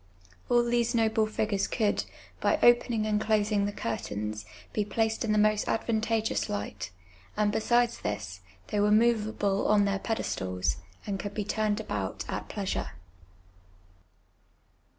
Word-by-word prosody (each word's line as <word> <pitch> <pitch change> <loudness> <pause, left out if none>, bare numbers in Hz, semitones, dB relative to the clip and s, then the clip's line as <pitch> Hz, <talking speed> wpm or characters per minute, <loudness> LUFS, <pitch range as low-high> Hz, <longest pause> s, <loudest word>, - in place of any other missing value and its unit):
All 240 0 +5
these 240 0 +1
noble 220 -1 +2
figures 210 -2 0
could, 215 -3 0 0.3
by - - +2
opening 240 -2 +4
and 215 0 +1
closing 210 -2 +2
the - - -2
curtains, 105 - -4 0.3
be 210 - +1
placed 220 +2 0
in 220 - 0
the 215 - +3
most 215 0 +3
advantageous 225 0 0
light, 100 -2 -4 0.5
and 210 -1 +2
besides 235 +2 +2
this, 95 -4 -4 0.3
they 205 - 0
■were 205 +1 +3
moveable 215 -3 +2
on 205 -1 +4
theii* 195 -1 0
pedestals, 95 - -1 0.3
and 200 -2 -3
could 205 +1 -5
be 210 - -2
turned 215 0 0
about 105 - -3
at - - -4
j)leasure. - - -3
210 Hz, 135 wpm, -29 LUFS, 195-225 Hz, 0.5 s, All